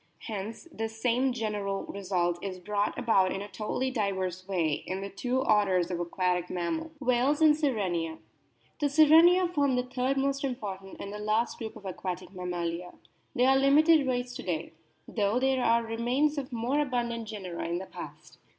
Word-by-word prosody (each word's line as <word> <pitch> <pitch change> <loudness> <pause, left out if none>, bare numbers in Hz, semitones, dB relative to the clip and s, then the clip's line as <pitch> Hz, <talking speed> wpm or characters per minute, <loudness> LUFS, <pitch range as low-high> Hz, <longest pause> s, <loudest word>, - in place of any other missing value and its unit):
Hence 215 - -6
the 225 -4 -3
same 245 +4 +1
general 210 -4 -2
result 180 -3 -2
is 190 -2 -4
brought 205 +3 -1
about 220 -7 +3
in 195 - -3
a - - -7
totally 215 +6 -2
diverse 190 -5 -2
way 165 -6 0
in 190 +1 -3
the 200 0 -6
two 250 +6 -1
orders 190 -6 +2
of 175 - -2
aquatic 180 0 -1
mammals. 315 - -3
WHALES 260 +2 +2
AND 310 -2 +6
SIRENIA 190 - -1 0.6
The 290 -2 +1
Sirenia 325 +5 +6
form 280 -4 +2
the 250 - +1
third 255 +2 -1
most 275 +1 0
important 200 -7 -5
and 200 - -6
the 210 - -6
last 215 +3 0
group 225 -2 -6
of 200 - -12
aquatic 185 -1 -5
mammalia. 175 -1 -4 0.4
They 250 - +3
are 265 +1 +5
a - - +3
limited 295 +2 +5
race 245 -1 -1
to - - -6
day, 165 -2 -3 0.3
though 210 +2 +1
there 265 -1 +2
are 230 0 +3
remains 245 +7 0
of 265 -2 -7
more 245 +5 0
abundant 240 -5 -1
genera 190 -7 -5
in 170 +1 -1
the 190 - -5
past. - - -11
220 Hz, 180 wpm, -29 LUFS, 185-260 Hz, 0.6 s, AND